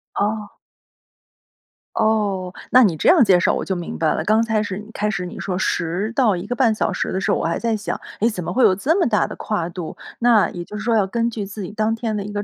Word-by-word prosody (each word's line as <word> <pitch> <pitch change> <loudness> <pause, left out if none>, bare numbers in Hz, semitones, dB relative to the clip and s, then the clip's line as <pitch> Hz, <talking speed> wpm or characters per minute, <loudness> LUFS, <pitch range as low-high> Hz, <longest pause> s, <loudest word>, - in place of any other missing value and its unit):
哦。 210 0 -1 1.4
哦， 205 -5 0 0.2
那 255 +1 +7
你 180 -7 +3
这 - - +2
样 335 -8 +7
介 185 -4 +5
绍 - - +2
我 - - -2
就 190 - -1
明 175 -1 -5
白 160 -1 +1
了。 160 - -2
刚 215 +4 +3
才 220 -2 0
始 205 0 -5
开 210 0 -1
始 180 -3 -2
你 180 - -8
说 180 -2 -3
10 185 +5 -1
到 230 -8 +3
1 175 - -6
个 245 - -2
半 240 -4 +3
小 210 -2 -1
时 - - -2
的 190 - -1
时 - - 0
候， - - +2
我 - - -2
还 165 - -1
在 230 -1 0
想， 210 0 -4 0.2
哎， 230 - +4
怎 180 -6 -5
么 - - -4
会 255 - +3
有 185 - +6
这 285 - +1
么 350 - +3
大 210 -3 +2
的 - - -7
跨 190 -6 -2
度？ 175 -2 -7 0.2
那 235 -3 +4
也 175 -1 -6
就 210 - -8
是 210 - -6
说， 230 -1 +2
要 205 -3 +3
根 230 +4 -1
据 215 -3 -4
自 205 +1 -8
己 180 - -6
当 215 +1 0
天 225 -1 -2
的 200 - -2
一 205 - -7
个 205 0 -3
210 Hz, 280 characters per minute, -21 LUFS, 185-225 Hz, 1.4 s, 那